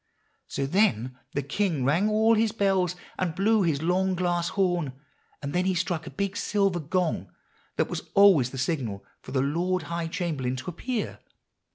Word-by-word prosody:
"So 140 - -2
then 130 - +1
the 145 - -1
king 150 -1 0
rang 170 +10 +3
all 220 +1 +4
his 220 0 +2
bells, 195 -4 +1 0.2
and 175 -4 -1
blew 215 +2 +3
his 160 -5 +1
long 185 +2 +2
glass 175 -1 0
horn, 175 -8 0 0.5
and 140 - -3
then 180 +1 +1
he 190 -1 +1
struck 175 -2 -1
a - - -4
big 200 0 -3
silver 200 -5 +1
gong 170 +2 -1 0.4
that - - +1
was - - -6
always 195 -11 +6
the 135 - -8
signal 125 -8 -2 0.2
for - - -10
the 130 -1 +1
Lord 175 +6 0
High 170 -1 -1
Chamberlain 155 -8 -2
to 130 +7 -5
appear. 240 +6 -3
175 Hz, 175 wpm, -27 LUFS, 145-195 Hz, 0.5 s, always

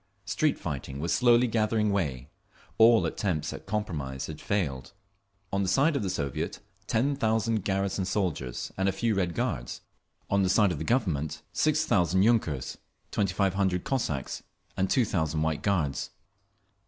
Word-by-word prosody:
Street 135 +8 +1
fighting 70 -3 -5
was 85 +3 0
slowly 120 0 +5
gathering 110 -2 +1
way; 70 -10 -1 0.5
all 115 0 +7
attempts 80 -6 -2
at - - -10
compromise 80 -11 -3
had 75 -1 -8
failed…. 80 -8 -2 0.6
On 100 - +1
the 95 - 0
side 140 - +3
of 140 - 0
the 100 - -2
Soviet, 70 -7 -3 0.3
ten 130 +5 +1
thousand 110 -4 +1
garrison 95 0 0
soldiers 90 - -2
and 95 +1 +2
a - - -1
few 115 +3 0
Red 90 -4 -1
Guards; - - -2 0.5
on 100 0 +2
the 95 - +2
side 100 0 +4
of 75 - -3
the - - -3
Government, 85 - 0
six 155 0 +2
thousand 95 - +3
yunkers, 105 - +1 0.3
twenty 100 -3 0
five 100 -2 +2
hundred 95 -2 0
Cossacks 80 - -2 0.3
and 95 -1 0
two 125 - +3
thousand 80 -5 0
White 80 -1 -1
Guards. 85 -9 0
95 Hz, 160 wpm, -28 LUFS, 80-110 Hz, 0.6 s, all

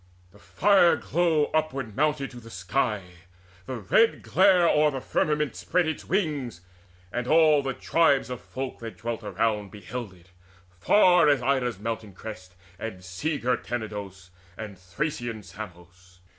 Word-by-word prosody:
The - - -19
fire 175 - +4
glow 160 -3 +1
upward 135 -8 -1
mounted 150 -1 0
to 125 - -10
the 115 -1 -13
sky, 100 +3 -1 0.6
The 130 - -4
red 120 - +2
glare 185 -2 +4
o'er 150 -1 +4
the 135 -2 -4
firmament 150 +2 0
spread 180 -3 0
its 160 - -4
wings, 145 - -1 0.5
And 120 0 -3
all 155 -1 +5
the 135 -2 -3
tribes 140 -6 +2
of 125 - -5
folk 130 0 -6
that 115 -1 -8
dwelt 115 0 -4
around 105 -3 -1
Beheld 105 +1 -7
it, 90 +1 -22 0.5
far 180 - +5
as 140 -4 +2
Ida's 125 -4 +1
mountain 110 -1 -5
crests, 95 -4 -9 0.2
And 95 -5 -6
sea 145 - -3
girt 125 -2 -1
Tenedos, 100 -6 -6 0.3
and 105 -2 -7
Thracian 110 - -4
Samos. 90 -1 -12
120 Hz, 145 wpm, -26 LUFS, 100-150 Hz, 0.6 s, all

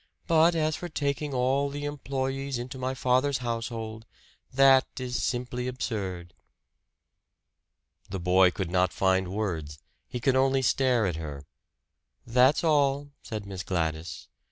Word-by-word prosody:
But 165 +1 +4
as 155 -1 +1
for 175 - -6
taking 145 -1 -2
all 135 +2 +1
the 145 +1 -5
employees 135 -2 -3
into 125 +2 -6
my 130 +1 -2
father's 130 +2 +2
household 115 -2 -4 0.4
that 135 0 +6
is 125 -1 -3
simply 125 0 -2
absurd." 95 -9 -4 1.8
The 95 - -4
boy 90 +1 +5
could 90 -1 -4
not 90 0 +2
find 95 -1 +2
words. 90 -7 -3 0.3
He 125 - -5
could 130 +1 +2
only 135 0 +3
stare 125 -3 +2
at 90 -4 -1
her. 75 -3 -7 0.8
"That's 125 +6 +4
all," 145 -2 +2
said 110 -3 -6
Miss 95 -2 -6
Gladys. 80 -4 -3
125 Hz, 130 wpm, -27 LUFS, 95-135 Hz, 1.8 s, that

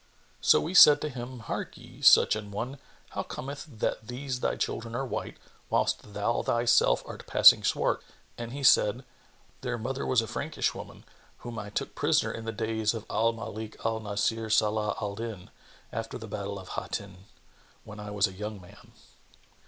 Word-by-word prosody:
So - - +5
we 170 - -4
said 150 -5 +9
to 150 - -2
him, 125 -2 -7
"Harkye, - - -7
such - - +7
an 105 -1 -6
one, 120 +7 -5 0.3
how - - -3
cometh 140 +3 -7
it 120 -8 -16
that 110 - -1
these 125 +1 -4
thy - - 0
children 115 0 -3
are 135 - -1
white, 125 - -5 0.3
whilst 105 - 0
thou 105 +3 0
thyself 120 0 +3
art - - -9
passing - - +7
swart?" - - +1 0.3
and 120 0 -6
he 140 +2 -6
said, 120 0 +4 0.6
"Their 125 -2 -2
mother 130 +4 -3
was 130 - +2
a 115 - 0
Frankish - - -2
woman, - - -10 0.4
whom 120 -2 -5
I 105 -1 -6
took 105 - -3
prisoner - - +2
in 115 - -7
the 115 - -2
days 110 0 -1
of 110 - -6
Al 115 +2 +2
Malik 110 -1 -7
al 115 0 0
Nбsir 110 +2 -1
Salбh 105 0 +2
al 105 -2 -3
Dнn,[FN#28] 110 -5 -6 0.4
after 115 0 -4
the 110 -2 -9
battle 100 -1 -5
of 95 -1 -10
Hattнn,[FN#29] 95 -2 -5 0.7
when 105 +1 -10
I 105 0 -7
was 105 0 +2
a 95 - -4
young 105 +2 -6
man." 90 - -17
115 Hz, 180 wpm, -28 LUFS, 105-120 Hz, 0.7 s, said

